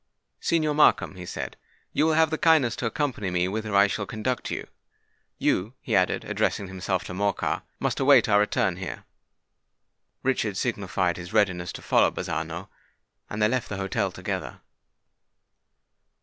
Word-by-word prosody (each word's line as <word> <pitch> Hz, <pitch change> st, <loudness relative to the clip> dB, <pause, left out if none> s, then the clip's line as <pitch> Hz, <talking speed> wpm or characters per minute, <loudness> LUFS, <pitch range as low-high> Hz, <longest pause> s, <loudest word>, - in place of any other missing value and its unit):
"Signor 155 Hz, -3 st, +1 dB
Markham," 150 Hz, -8 st, +4 dB
he 90 Hz, -2 st, -9 dB
said, -, -, -5 dB, 0.4 s
"you 155 Hz, -, +3 dB
will 160 Hz, -, +3 dB
have 160 Hz, -1 st, +4 dB
the 160 Hz, -, 0 dB
kindness 155 Hz, -8 st, +4 dB
to 120 Hz, -, -1 dB
accompany 120 Hz, -6 st, -2 dB
me 90 Hz, 0 st, +1 dB
whither 110 Hz, +1 st, -3 dB
I 100 Hz, 0 st, +7 dB
shall 105 Hz, 0 st, -2 dB
conduct 110 Hz, +3 st, -2 dB
you. -, -, -4 dB, 0.7 s
You," 105 Hz, +8 st, 0 dB
he 115 Hz, -, -2 dB
added, 90 Hz, -1 st, +2 dB
addressing 100 Hz, -, 0 dB
himself 95 Hz, -1 st, -2 dB
to -, -, -7 dB
Morcar, 100 Hz, +1 st, 0 dB, 0.2 s
"must -, -, -1 dB
await 135 Hz, -3 st, +6 dB
our 105 Hz, -1 st, +5 dB
return 105 Hz, -, +1 dB
here." -, -, -6 dB, 1.2 s
Richard 115 Hz, -6 st, 0 dB
signified 95 Hz, -6 st, -1 dB
his 90 Hz, +3 st, -8 dB
readiness 95 Hz, -5 st, +2 dB
to -, -, -9 dB
follow -, -, +4 dB
Bazzano; -, -, -4 dB, 0.6 s
and 105 Hz, 0 st, -1 dB
they -, -, +6 dB
left 125 Hz, +2 st, -1 dB
the 105 Hz, -, -4 dB
hotel 95 Hz, 0 st, -1 dB
together. -, -, -5 dB
105 Hz, 155 wpm, -26 LUFS, 95-130 Hz, 1.2 s, I